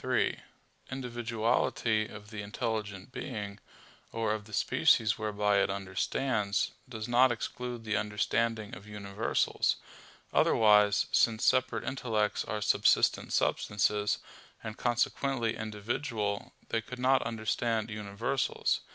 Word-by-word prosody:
3: - - +1 0.5
Individuality 115 -3 0
of 105 +1 -11
the 110 -2 -5
intelligent 105 -1 -4
being, 100 -4 -5 0.5
or 115 -2 0
of 105 -1 -5
the 110 - -14
species 105 +1 +3
whereby 105 -1 +1
it - - +2
understands, 100 +2 -1 0.2
does 110 -3 -5
not 125 +1 +5
exclude 120 0 -4
the 110 -1 -1
understanding 110 +1 0
of 100 +3 -10
universals; 105 0 0 0.6
otherwise, 105 -2 +5
since 115 -1 +3
separate 130 -1 +2
intellects 110 -6 -1
are 105 -1 -3
subsistent - - +3
substances, 105 0 +1 0.5
and 110 -1 -5
consequently 120 0 0
individual, 110 0 -3 0.2
they 115 - 0
could 125 +3 -8
not 130 +1 +3
understand 115 0 -1
universals. 105 +5 -1
110 Hz, 110 wpm, -30 LUFS, 105-120 Hz, 0.6 s, not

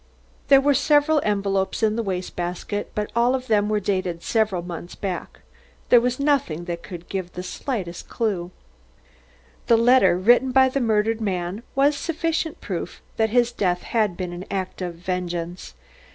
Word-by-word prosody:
There 275 -1 +7
were 285 +1 +3
several 295 +2 +3
envelopes 195 0 0
in 215 -1 +3
the 230 - 0
waste 185 -4 -4
basket, 180 +4 -4
but 210 0 -2
all 240 +2 +3
of 255 -1 -4
them 210 -3 +2
were 215 -1 +1
dated 185 -4 -2
several 215 -6 0
months 175 0 -7
back. 190 -3 -5 0.5
There 245 - +7
was 250 +1 -1
nothing 275 - +1
that 170 -1 -4
could 175 -1 -9
give 185 -2 -4
the 180 - -6
slightest 185 -3 -5
clue. 195 -7 -1 1.2
The 230 - +6
letter 230 -7 +5
written 240 +7 +4
by 260 0 +5
the 275 +1 -1
murdered 225 0 +1
man 185 0 -2
was 280 +2 +4
sufficient 330 0 -2
proof - - -5 0.2
that 220 0 +2
his 240 +1 +3
death 180 -6 -1
had 210 -6 0
been 180 -2 -4
an 175 +2 -7
act 190 -1 -4
of 175 -2 -4
vengeance. 175 - -4
205 Hz, 165 wpm, -23 LUFS, 180-245 Hz, 1.2 s, There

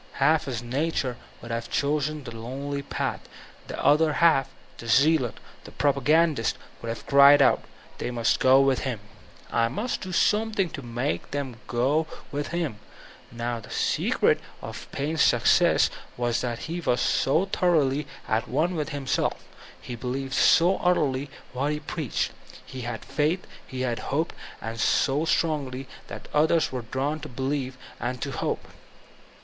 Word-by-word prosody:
Half 150 +3 +3
his 120 -3 -4
nature 130 0 -1 0.3
would 120 - -7
have 115 0 -3
chosen 150 +1 0
the 120 - -7
tonely 135 +5 -4
path; - - -4 0.4
the - - -6
other 155 +1 +5
half, 145 -5 +4 0.3
the 115 - -8
zealot, 140 0 +3 0.2
the - - -10
propagandist, 145 -1 +2 0.2
would 115 - -5
have 115 - -5
cried 140 +1 +8
out, 135 - +4 0.4
they - - -2
must 120 -2 +1
go 135 +1 +6
widi 135 -1 +1
me; - - -14 0.5
I 115 -1 +2
must 210 - -3
do 185 - -5
something 210 -1 +2
to 150 - -6
make 120 +3 -3
them 140 -4 -4
go 135 +8 +1 0.2
with 145 0 -3
me. 170 -6 -1 0.6
Now 120 0 -3
the 110 - -13
secret - - +2 0.2
of - - -8
Paine's 150 +3 -1
success - - +4 0.3
was 120 -1 0
that 120 -2 -3
he 170 +3 -3
was 125 -6 +1
so 160 +8 +2
thoroughly 150 -7 +1 0.2
at 110 +2 0
one 160 +7 +1
with 155 -3 -2
himself, 140 -4 -1 0.4
he 125 - -7
believed 130 +3 -4
so 175 +7 +5
utterly 145 -6 +1 0.2
what 140 +4 0
he 150 - -3
preached, 150 -2 -2 0.3
he 130 - -7
had 120 -2 -5
faith, 160 +4 0 0.2
he 130 0 -4
hoped, 135 +6 -1 0.3
and 115 +1 -5
so 140 +7 +2
strongly 140 -6 0 0.2
tfial - - -7
others 160 +2 +3
were 130 -1 -3
drawn 135 +6 -2
to 155 +1 -8
believe 130 0 -2 0.2
and 125 +1 -3
to 140 - -3
hope. - - -3
140 Hz, 155 wpm, -26 LUFS, 125-155 Hz, 0.6 s, cried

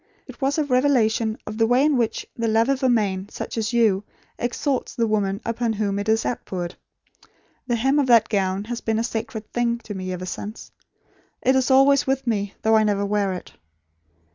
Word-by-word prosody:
It 255 0 -13
was 275 +2 +1
a 310 - +2
revelation 250 -5 +2
of 215 +1 -6
the 225 - +4
way 250 +4 +4
in 300 -2 +3
which 235 -3 -1
the 230 -1 -1
love 225 +3 +2
of 275 0 +1
a 260 - +3
man 200 -4 0
such - - -6
as 220 -1 -1
you 220 -5 +3 0.4
exalts 255 +3 -2
the 230 - +1
woman 205 -2 0
upon 230 0 -1
whom 200 -2 -1
it 205 +2 -3
is 220 0 +2
outpoured. 180 -7 -4 0.9
The 240 - +1
hem 270 +5 +2
of 280 - +1
that 230 -3 +5
gown 195 -2 0
has 235 +2 -5
been 220 -1 -1
a 225 - 0
sacred 225 -2 -5
thing 235 -1 +1
to 210 - -6
me, 185 -1 -5
ever 180 0 -5
since. 210 +4 -7 0.7
It 260 - +4
is 260 0 +2
always 270 +1 +5
with 270 0 0
me, 205 -4 -1
though 220 0 +4
I 215 - +4
never 200 -1 +1
wear 200 -1 0
it. 180 - -8
225 Hz, 205 wpm, -23 LUFS, 205-250 Hz, 0.9 s, that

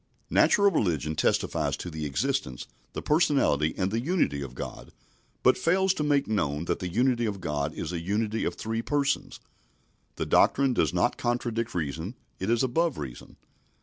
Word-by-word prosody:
Natural 200 -2 +5
religion 80 - 0
testifies - - 0
to 90 - -6
the 80 -1 -4
existence, 65 -2 -2 0.3
the - - -5
personality, 140 - +2
and 95 0 0
the 115 - 0
unity 130 - 0
of 65 -2 -7
God, - - -7 0.5
but 130 - +5
fails 190 +2 +3
to 150 - -2
make 145 -2 +2
known 80 -7 -1
that - - -1
the 90 - -3
unity 120 +4 +2
of 100 -2 -3
God 75 -3 -2
is 80 - -4
a 85 - -2
unity 105 +4 -1
of - - -1
three 115 +1 -3
Persons. 140 +2 -1 0.8
The - - -2
doctrine 135 -2 +4
does 80 - +2
not - - +1
contradict 120 -2 -2
reason, 80 - -3 0.2
it 95 - -2
is 120 +1 +2
above 160 +5 +1
reason. 65 -5 -8
110 Hz, 170 wpm, -27 LUFS, -, 0.8 s, Natural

